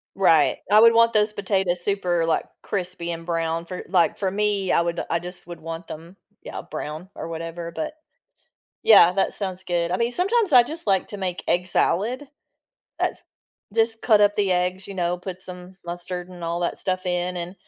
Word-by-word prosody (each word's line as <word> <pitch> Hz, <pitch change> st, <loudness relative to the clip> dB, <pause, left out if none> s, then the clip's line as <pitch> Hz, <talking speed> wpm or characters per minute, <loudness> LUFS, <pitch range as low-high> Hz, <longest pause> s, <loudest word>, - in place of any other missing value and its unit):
Right, 165 Hz, -6 st, +4 dB
I 210 Hz, -, +8 dB
would 230 Hz, +1 st, +7 dB
want 230 Hz, 0 st, +5 dB
those 210 Hz, 0 st, +2 dB
potatoes 190 Hz, -3 st, 0 dB
super, 175 Hz, -4 st, 0 dB
like, 165 Hz, -, +1 dB, 0.2 s
crispy 180 Hz, -3 st, -3 dB
and 165 Hz, 0 st, -6 dB
brown 165 Hz, -1 st, -1 dB
for 180 Hz, +1 st, -6 dB
like, 180 Hz, -2 st, +3 dB
for 190 Hz, -2 st, -1 dB
me, 200 Hz, -1 st, 0 dB
I -, -, +4 dB
would 170 Hz, 0 st, -2 dB
I 170 Hz, -, +1 dB
just 180 Hz, +1 st, -8 dB
would 170 Hz, -2 st, -8 dB
want 165 Hz, +1 st, -7 dB
them 165 Hz, +4 st, -9 dB, 0.3 s
Yeah, -, -, -7 dB
brown 155 Hz, +5 st, -7 dB
or 165 Hz, -, -6 dB
whatever, 165 Hz, +1 st, -6 dB
but 305 Hz, -, -4 dB, 0.9 s
Yeah, 195 Hz, -5 st, +8 dB
that 195 Hz, -, +1 dB
sounds 190 Hz, -2 st, -4 dB
good. 175 Hz, -1 st, -1 dB
I 185 Hz, -, +1 dB
mean, 235 Hz, +1 st, 0 dB
sometimes 400 Hz, -, +1 dB
I 245 Hz, -1 st, +9 dB
just 315 Hz, +1 st, -6 dB
like 195 Hz, -2 st, +2 dB
to 205 Hz, -, -6 dB
make 185 Hz, -2 st, -3 dB
egg 180 Hz, +1 st, +1 dB
salad. 235 Hz, +10 st, 0 dB, 0.7 s
That's -, -, -1 dB, 0.5 s
Just 225 Hz, 0 st, +1 dB
cut 215 Hz, -3 st, +5 dB
up 205 Hz, 0 st, +4 dB
the 200 Hz, -2 st, +1 dB
eggs, 180 Hz, +1 st, -1 dB
you 200 Hz, -, -7 dB
know, 175 Hz, -1 st, 0 dB
put 185 Hz, 0 st, -7 dB
some 180 Hz, 0 st, -10 dB
mustard 175 Hz, +1 st, -5 dB
and 180 Hz, -1 st, -11 dB
all 170 Hz, +1 st, -2 dB
that 175 Hz, -, -2 dB
stuff 185 Hz, -1 st, -2 dB
in, 180 Hz, 0 st, -1 dB
and 175 Hz, +1 st, -5 dB
180 Hz, 195 wpm, -24 LUFS, 170-205 Hz, 0.9 s, I